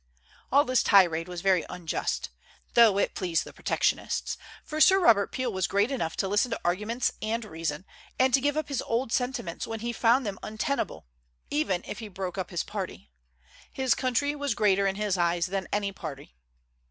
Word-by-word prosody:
All 285 +3 +5
this 255 -1 +2
tirade 170 -5 +4
was 180 -1 -6
very 190 -3 +3
unjust, 180 -3 -3 0.4
though 225 -4 +6
it - - +1
pleased 175 -4 0
the - - -12
protectionists, - - -1 0.3
for 310 +1 -3
Sir 385 +4 +7
Robert 220 - +4
Peel 255 -3 -2
was 190 -1 0
great 205 +6 +1
enough 200 -12 -2
to 195 - 0
listen 205 +5 +2
to - - -3
arguments 210 +8 0
and 225 +1 -2
reason, 165 -2 -4 0.3
and 260 0 +3
give 285 +3 +2
up 310 - -1
his 280 -4 -2
old 230 +1 -1
sentiments 245 -9 -2
when 225 -1 -5
he 235 +1 -2
found 240 +3 +3
them 200 -2 -4
untenable, 215 - -3 0.5
even 175 +5 0
if - - -6
he 225 - -6
broke 190 -2 -5
up 185 - -3
his 175 -3 -2
party. - - -6 0.6
His 260 -2 +1
country 260 +3 0
was 285 -5 -2
greater 200 -3 +3
in 195 - -1
his 205 -3 -1
eyes 170 0 +2
than 190 0 -3
any 200 -1 0
party. 150 -7 -8
205 Hz, 185 wpm, -27 LUFS, 180-250 Hz, 0.6 s, Sir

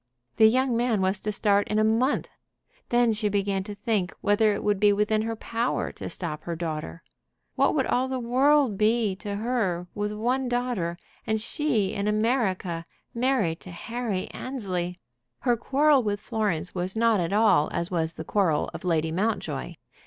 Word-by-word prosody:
The 220 - +8
young 255 +2 +2
man 235 -2 +1
was 190 +1 +1
to 210 - -3
start 205 -1 +2
in 215 - -1
a 215 - +4
month! 230 +6 +2 0.6
Then 240 -1 +3
she 210 0 0
began 200 -1 0
to 205 -1 -7
think 205 -3 -1
whether 210 +1 +3
it - - -5
would 205 -2 +1
be 205 0 +5
within 210 +1 +1
her 225 +1 -2
power 230 +2 -2
to - - -7
stop 155 -4 -4
her 170 - -3
daughter. 155 - -5 0.5
What - - +2
would - - +2
all 255 +1 +1
the 260 0 -2
world 255 -1 +3
be 215 -2 +2
to 205 0 -5
her 205 -6 -1
with 210 0 -2
one 245 +5 -1
daughter, 245 -9 -1 0.3
and 220 0 +1
she 230 -4 0
in 200 0 -2
America, 210 -6 0 0.3
married 235 -9 +1
to - - -12
Harry 220 +1 -3
Annesley? 185 -9 -4 0.4
Her 245 -2 +2
quarrel 280 +4 +3
with 205 -3 -1
Florence 205 -8 -2
was 185 +2 -3
not 225 -2 +3
at 170 0 -1
all 210 -7 +4
as 170 +2 -2
was 165 -2 0
the 160 - -7
quarrel 175 -7 +1
of - - -7
Lady 160 -3 +1
Mountjoy. 205 +7 -2
210 Hz, 175 wpm, -26 LUFS, 185-235 Hz, 0.6 s, The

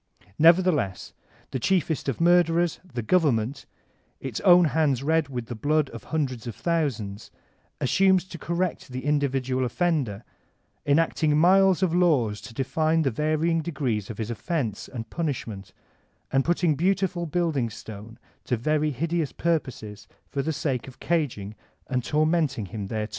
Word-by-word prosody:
Nevertheless, 165 - +3 0.4
thw 130 - -2
cliiefest 165 -1 0
of 135 - -2
murderers, 175 -1 +3
the 125 -10 -6
Government, 135 -4 +1 0.5
its 130 -5 -4
own 180 -2 +6
hands 140 -5 +2
red 160 -1 +1
with 125 -3 -4
the 120 - -6
bkxxl 150 +4 +1
of 115 - -9
hundreds 130 -7 -2
of 115 - -5
thousands, 130 -12 -2 0.5
assumes 190 +6 +3
to 175 -3 -10
correct 175 +1 -2
the 130 +1 -6
individual 135 -3 0
offender, 125 - -1 0.6
enacting 150 0 +2
miles 190 +3 +5
of 175 -3 +1
laws 135 - +2
to 115 - -10
define 155 +5 +1
the 135 - +1
varying 155 +5 +1
degrees 135 - -2
of 110 - -6
his 110 0 -3
offense 120 - -3
and 115 -3 -7
punish* 155 -6 -2
ment, 100 -4 -9 0.6
and 135 0 +3
putting 170 0 +2
beautiful 180 +2 0
building 155 -7 0
stone 110 +1 -10 0.3
to 125 - 0
very 150 +5 +1
hideous 160 +2 -1
purposes 130 -11 -3 0.2
for 140 - -2
the 160 - -1
sake 140 -5 -2
of 130 - -12
caging 130 -12 -1 0.3
and 125 -1 -1
tormentiqg 150 - 0
him 100 0 -5
thereto. 110 +1 -3
145 Hz, 145 wpm, -25 LUFS, 120-170 Hz, 0.6 s, own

